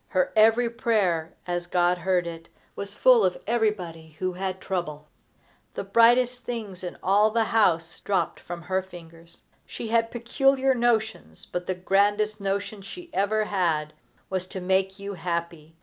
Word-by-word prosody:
Her 185 Hz, -1 st, 0 dB
every 225 Hz, +2 st, +5 dB
prayer, 205 Hz, -9 st, 0 dB
as 175 Hz, -1 st, -3 dB
God 175 Hz, 0 st, +2 dB
heard 180 Hz, 0 st, +1 dB
it, 165 Hz, -1 st, -8 dB, 0.3 s
was 200 Hz, 0 st, -6 dB
full -, -, +5 dB
of -, -, +1 dB
everybody 180 Hz, -9 st, -1 dB
who 185 Hz, 0 st, -2 dB
had 190 Hz, +1 st, -4 dB
trouble. 155 Hz, -6 st, -4 dB, 0.7 s
The -, -, -3 dB
brightest 240 Hz, +4 st, +4 dB
things 215 Hz, -7 st, -6 dB
in 180 Hz, -, -6 dB
all 205 Hz, +3 st, +4 dB
the 225 Hz, +1 st, +1 dB
house 175 Hz, -7 st, +1 dB
dropped 185 Hz, -5 st, -1 dB
from 175 Hz, -1 st, -8 dB
her 190 Hz, +2 st, 0 dB
fingers. 170 Hz, -2 st, -14 dB, 0.2 s
She 225 Hz, -, -7 dB
had 230 Hz, 0 st, +2 dB
peculiar 265 Hz, +3 st, +2 dB
notions, 220 Hz, -, -1 dB
but 180 Hz, 0 st, -5 dB
the 185 Hz, -, -1 dB
grandest 205 Hz, +3 st, +1 dB
notion 200 Hz, +1 st, -2 dB
she 345 Hz, -, -10 dB
ever 215 Hz, +2 st, +1 dB
had 160 Hz, -7 st, 0 dB, 0.3 s
was 185 Hz, -1 st, -3 dB
to 190 Hz, -, -6 dB
make 190 Hz, +1 st, 0 dB
you 200 Hz, 0 st, -6 dB
happy. 170 Hz, -3 st, -4 dB
190 Hz, 155 wpm, -26 LUFS, 175-220 Hz, 0.7 s, every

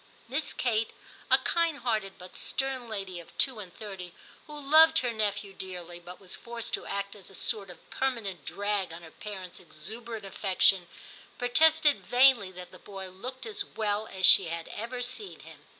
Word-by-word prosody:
Miss 275 Hz, +6 st, -2 dB
Kate, 225 Hz, -3 st, 0 dB, 0.4 s
a -, -, +8 dB
kind 335 Hz, -3 st, +1 dB
hearted 220 Hz, -6 st, -1 dB
but 180 Hz, 0 st, -12 dB
stern 265 Hz, -3 st, -2 dB
lady 195 Hz, -4 st, -4 dB
of 170 Hz, -, -14 dB
two 260 Hz, -5 st, +4 dB
and 190 Hz, -4 st, -8 dB
thirty, 190 Hz, -3 st, -8 dB, 0.3 s
who 300 Hz, -1 st, -8 dB
loved 315 Hz, +3 st, +7 dB
her 240 Hz, -, 0 dB
nephew 205 Hz, -2 st, -1 dB
dearly, 180 Hz, -2 st, -6 dB
but 175 Hz, +1 st, -11 dB
was 190 Hz, -2 st, -7 dB
forced 235 Hz, -1 st, -5 dB
to -, -, -2 dB
act 200 Hz, 0 st, -3 dB
as 200 Hz, -3 st, -13 dB
a 195 Hz, -, -11 dB
sort 205 Hz, -2 st, -1 dB
of 180 Hz, -, -14 dB
permanent 225 Hz, -, -2 dB
drag 205 Hz, 0 st, -1 dB
on 170 Hz, +1 st, -9 dB
her 160 Hz, -, -12 dB
parents' 190 Hz, -4 st, -7 dB
exuberant 215 Hz, +6 st, -7 dB
affection, 190 Hz, -2 st, +3 dB, 0.5 s
protested 310 Hz, +4 st, +4 dB
vainly 245 Hz, -6 st, +5 dB
that 180 Hz, -1 st, -10 dB
the -, -, -14 dB
boy 195 Hz, -2 st, -7 dB
looked 250 Hz, +7 st, -7 dB
as 220 Hz, -2 st, -2 dB
well 210 Hz, 0 st, -2 dB
as 190 Hz, -1 st, +1 dB
she 190 Hz, -, +9 dB
had 165 Hz, 0 st, -5 dB
ever 240 Hz, +3 st, -4 dB
seen 255 Hz, -, -4 dB
him. -, -, -14 dB
210 Hz, 180 wpm, -29 LUFS, 185-245 Hz, 0.5 s, she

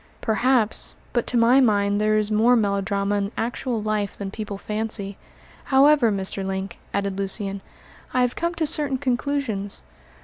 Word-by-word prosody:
"Perhaps; 230 Hz, 0 st, +1 dB, 0.2 s
but 240 Hz, -, 0 dB
to 245 Hz, -, +1 dB
my 235 Hz, +3 st, +5 dB
mind 205 Hz, -4 st, +2 dB
there 215 Hz, 0 st, +3 dB
is 215 Hz, 0 st, 0 dB
more 225 Hz, +4 st, +4 dB
melodrama 200 Hz, -1 st, 0 dB
in 200 Hz, 0 st, -2 dB
actual 240 Hz, 0 st, -2 dB
life 215 Hz, -1 st, -1 dB
than 195 Hz, -1 st, -5 dB
people 210 Hz, -2 st, -5 dB
fancy. 210 Hz, -1 st, -2 dB, 0.5 s
However, 275 Hz, -3 st, +5 dB
Mr. 195 Hz, 0 st, -2 dB
Link," 190 Hz, 0 st, -4 dB
added 200 Hz, -1 st, -2 dB
Lucian, 195 Hz, 0 st, -3 dB, 0.5 s
"I 255 Hz, -, +2 dB
have 250 Hz, 0 st, +1 dB
come 340 Hz, +1 st, -2 dB
to 330 Hz, -1 st, 0 dB
certain 295 Hz, -3 st, +1 dB
conclusions. 250 Hz, -6 st, -1 dB
215 Hz, 150 wpm, -23 LUFS, 200-250 Hz, 0.5 s, my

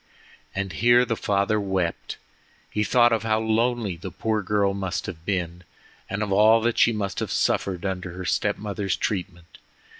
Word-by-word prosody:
And 100 Hz, -2 st, -3 dB
here 120 Hz, +6 st, +4 dB
the 115 Hz, -1 st, -1 dB
father 100 Hz, +1 st, +1 dB
wept. 95 Hz, -4 st, -2 dB, 0.5 s
He 105 Hz, -, 0 dB
thought 120 Hz, +2 st, +4 dB
of 110 Hz, -, +1 dB
how 110 Hz, 0 st, +1 dB
lonely 110 Hz, -2 st, 0 dB
the 95 Hz, +3 st, -7 dB
poor 110 Hz, +4 st, -1 dB
girl 100 Hz, 0 st, +1 dB
must 95 Hz, -2 st, -3 dB
have 85 Hz, -4 st, -8 dB
been, 90 Hz, -2 st, -2 dB, 0.5 s
and 100 Hz, +2 st, -2 dB
of 105 Hz, -, -4 dB
all 110 Hz, +3 st, +6 dB
that 115 Hz, +1 st, 0 dB
she -, -, +5 dB
must 105 Hz, -3 st, -3 dB
have -, -, -3 dB
suffered 95 Hz, -1 st, 0 dB
under 95 Hz, -2 st, -3 dB
her 90 Hz, +1 st, -7 dB
step 105 Hz, +2 st, 0 dB
mother's 100 Hz, -2 st, -2 dB
treatment. 90 Hz, -4 st, -4 dB
100 Hz, 175 wpm, -24 LUFS, 95-110 Hz, 0.5 s, all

